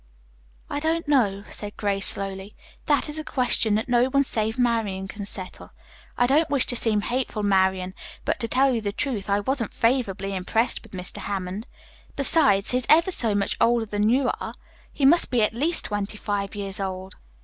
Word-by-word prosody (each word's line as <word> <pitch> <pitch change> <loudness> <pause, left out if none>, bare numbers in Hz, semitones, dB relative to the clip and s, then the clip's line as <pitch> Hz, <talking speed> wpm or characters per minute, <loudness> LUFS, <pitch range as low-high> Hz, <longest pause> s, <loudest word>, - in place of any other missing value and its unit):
"I - - -3
don't 320 +1 -1
know," 210 -9 +2
said 205 -1 -8
Grace 200 -2 +1
slowly. 195 +1 -2 0.3
"That 290 -1 +2
is 300 +1 -5
a - - -4
question 245 -6 +1
that 220 - -1
no 245 0 +3
one 275 +2 +2
save 220 -3 -2
Marian 225 -6 0
can 200 +1 -7
settle. 185 -2 -6 0.4
I 245 - +4
don't 300 +5 +2
wish 280 -2 +2
to 245 - 0
seem 220 -3 +2
hateful, 240 -2 -2
Marian, 190 -2 +1 0.3
but - - -1
to 230 - -2
tell 265 +3 +2
you 230 - -1
the 205 -1 -2
truth, 215 -3 -3
I 200 +1 +2
wasn't 240 0 -2
favorably 230 -5 0
impressed 220 +6 0
with 225 - -17
Mr. 180 -1 -4
Hammond. 195 +2 -4 0.5
Besides, 275 -8 +4
he 250 - +2
is 250 - -3
ever 335 +4 +5
so 225 - +1
much 200 0 0
older 235 -1 +3
than 210 0 0
you 255 +2 +2
are. - - -6 0.4
He 280 - -1
must 335 +5 +5
be 240 -4 +2
at 210 - +1
least 310 +8 +2
twenty 205 0 -2
five 205 -1 -3
years 200 0 -4
old." 190 -1 -5
220 Hz, 195 wpm, -24 LUFS, 200-260 Hz, 0.5 s, ever